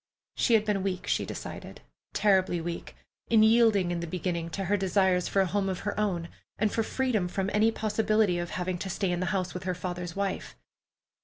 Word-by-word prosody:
She 235 Hz, -, +3 dB
had 215 Hz, -1 st, +3 dB
been 205 Hz, -2 st, 0 dB
weak, 185 Hz, -1 st, -2 dB
she -, -, 0 dB
decided, -, -, -7 dB, 0.3 s
terribly 190 Hz, -4 st, +2 dB
weak, 170 Hz, +1 st, -5 dB, 0.3 s
in 220 Hz, -2 st, +5 dB
yielding 220 Hz, -5 st, +4 dB
in 175 Hz, -, -1 dB
the 170 Hz, -, -4 dB
beginning 170 Hz, -1 st, -2 dB
to 195 Hz, +3 st, -4 dB
her 200 Hz, +3 st, +2 dB
desire 190 Hz, -1 st, +2 dB
for 195 Hz, +2 st, +1 dB
a -, -, +3 dB
home 195 Hz, +1 st, 0 dB
of 185 Hz, -, -3 dB
her 205 Hz, 0 st, -3 dB
own, 180 Hz, -5 st, 0 dB, 0.3 s
and 215 Hz, 0 st, +1 dB
for 225 Hz, -, +1 dB
freedom 225 Hz, -5 st, 0 dB
from 195 Hz, +2 st, -2 dB
any 215 Hz, +2 st, +4 dB
possibility 215 Hz, -4 st, +1 dB
of 175 Hz, 0 st, -3 dB
having 180 Hz, -1 st, -3 dB
to 190 Hz, -, -4 dB
stay 190 Hz, 0 st, -1 dB
in 175 Hz, -, -1 dB
the 185 Hz, -, -1 dB
house 185 Hz, -3 st, -1 dB
with 180 Hz, 0 st, -6 dB
her 185 Hz, -1 st, -1 dB
father's 175 Hz, -1 st, -5 dB
wife. 200 Hz, -1 st, -3 dB
190 Hz, 210 wpm, -28 LUFS, 180-210 Hz, 0.3 s, in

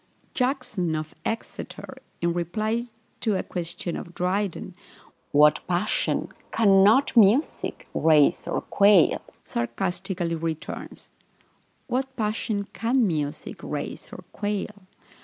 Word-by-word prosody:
Jackson 250 Hz, -, -1 dB
of 155 Hz, 0 st, -4 dB
Exeter, 225 Hz, -, -5 dB, 0.2 s
in 170 Hz, 0 st, +1 dB
reply 215 Hz, +7 st, -1 dB, 0.4 s
to 215 Hz, -3 st, +1 dB
a -, -, -1 dB
question 175 Hz, 0 st, -4 dB
of 170 Hz, -, -8 dB
Dryden, 185 Hz, +1 st, -1 dB, 0.6 s
"What 150 Hz, +1 st, +6 dB
passion 180 Hz, +4 st, 0 dB, 0.2 s
cannot 210 Hz, +5 st, +5 dB
music 230 Hz, +6 st, +3 dB
raise 155 Hz, -3 st, +4 dB
or -, -, -1 dB
quell?" 200 Hz, -4 st, +4 dB, 0.2 s
sarcastically 175 Hz, +7 st, -2 dB
returns, 160 Hz, -1 st, -5 dB, 0.7 s
"What 265 Hz, +1 st, -2 dB
passion 215 Hz, -2 st, -1 dB
can 240 Hz, +1 st, +2 dB
music 150 Hz, -5 st, -3 dB
raise -, -, -5 dB
or -, -, -9 dB
quell?" 205 Hz, -2 st, -4 dB
195 Hz, 100 wpm, -25 LUFS, 170-220 Hz, 0.7 s, What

